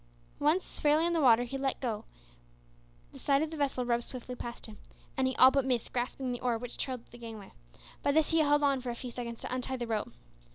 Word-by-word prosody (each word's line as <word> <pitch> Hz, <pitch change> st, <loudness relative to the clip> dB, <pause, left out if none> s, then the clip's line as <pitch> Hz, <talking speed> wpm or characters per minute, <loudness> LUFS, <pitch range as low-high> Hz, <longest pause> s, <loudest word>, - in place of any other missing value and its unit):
Once 310 Hz, +6 st, +1 dB
fairly 300 Hz, +2 st, +4 dB
in 340 Hz, -, +1 dB
the 330 Hz, -, +2 dB
water 245 Hz, -3 st, +6 dB
he 270 Hz, +3 st, -5 dB
let 270 Hz, -1 st, -1 dB
go, 230 Hz, -5 st, -3 dB, 1.1 s
the -, -, -12 dB
side 280 Hz, +1 st, +2 dB
of 315 Hz, -, -3 dB
the -, -, -5 dB
vessel 275 Hz, -4 st, 0 dB
rubbed 240 Hz, 0 st, +1 dB
swiftly 250 Hz, 0 st, -6 dB
past 240 Hz, -1 st, -7 dB
him, 215 Hz, -2 st, -10 dB, 0.4 s
and 260 Hz, 0 st, +2 dB
he 260 Hz, -, -1 dB
all 260 Hz, +1 st, +8 dB
but 275 Hz, 0 st, +2 dB
missed 250 Hz, -3 st, -1 dB
grasping 250 Hz, +1 st, -2 dB
the 245 Hz, -, -3 dB
oar 245 Hz, -2 st, +1 dB
which 245 Hz, +1 st, -7 dB
trailed 255 Hz, -3 st, -3 dB
at -, -, -28 dB
the 240 Hz, -, -12 dB
gangway. 220 Hz, -4 st, -9 dB, 0.5 s
By 285 Hz, -, +2 dB
this 315 Hz, 0 st, +3 dB
he 325 Hz, -, +4 dB
held 295 Hz, -1 st, +4 dB
on 275 Hz, -2 st, +3 dB
for 250 Hz, -, -4 dB
a 240 Hz, -, -3 dB
few 245 Hz, +1 st, -7 dB
seconds 235 Hz, -1 st, -6 dB
to -, -, -4 dB
untie 255 Hz, +1 st, -2 dB
the 240 Hz, -, -3 dB
rope. 220 Hz, -2 st, -2 dB
255 Hz, 245 wpm, -31 LUFS, 240-280 Hz, 1.1 s, all